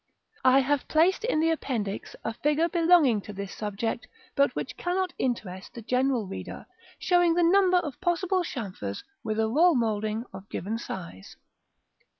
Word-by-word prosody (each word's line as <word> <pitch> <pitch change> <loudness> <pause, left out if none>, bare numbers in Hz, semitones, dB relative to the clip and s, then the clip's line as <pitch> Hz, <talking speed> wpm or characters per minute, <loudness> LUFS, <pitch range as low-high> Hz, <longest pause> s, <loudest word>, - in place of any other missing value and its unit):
I 260 +1 +6
have 280 +1 0
placed 335 +6 +3
in 385 -10 +1
the 325 0 +3
Appendix 225 -10 -3
a 225 - -2
figure 300 +7 +1
belonging 330 - +4
to 210 - -9
this 200 -1 -6
subject, 215 +2 -3 0.3
but 280 -2 +2
which - - -4
cannot 365 +1 -1
interest 195 -7 -3
the 235 - -8
general 250 -1 +1
reader, 195 - -7 0.3
showing 350 -2 +3
the 350 - +3
number 365 +1 +5
of 305 -5 -3
possible 365 +1 +1
chamfers 190 - -5 0.2
with 215 -1 -2
a 220 - +2
roll 320 +8 +4
moulding 220 -1 0
of 190 +1 -10
given 215 +6 -3
size. 95 - -8
255 Hz, 160 wpm, -27 LUFS, 215-340 Hz, 0.3 s, I